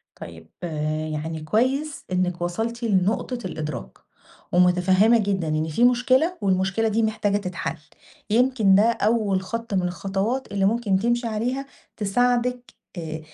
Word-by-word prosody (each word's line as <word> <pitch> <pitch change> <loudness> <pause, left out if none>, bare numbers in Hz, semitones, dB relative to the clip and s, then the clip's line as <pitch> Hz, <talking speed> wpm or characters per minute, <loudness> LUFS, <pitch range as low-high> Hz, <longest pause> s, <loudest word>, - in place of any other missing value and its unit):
طيب 80 -1 -11 0.6
يعني 160 +1 -4
كويس 260 - 0
إنِك 180 -1 0
وصلتِ 225 +7 -3
لنقطة 215 +4 0
الإدراك، 150 - -5 0.5
ومُتفهمة 180 +5 +4
جدًا 195 -6 -1
إن 155 +1 -1
في 160 +10 +2
مشكلة 255 +8 +3
والمشكلة 195 +2 +1
دي 220 +1 +1
محتاجة 215 -2 0
تتحل، 180 -4 -4 0.5
يمكن 230 -3 +3
ده 200 - +6
أول 215 -3 +1
خط 230 +2 -5
من 185 - +2
الخطوات 195 +8 -2
اللي 195 -1 0
ممكن 205 -2 +2
تمشي 240 +3 0
عليها 245 +5 -2 0.3
تساعدِك 245 +4 0 0.3
آآ 160 -1 -5
205 Hz, 125 wpm, -24 LUFS, 180-235 Hz, 0.6 s, ده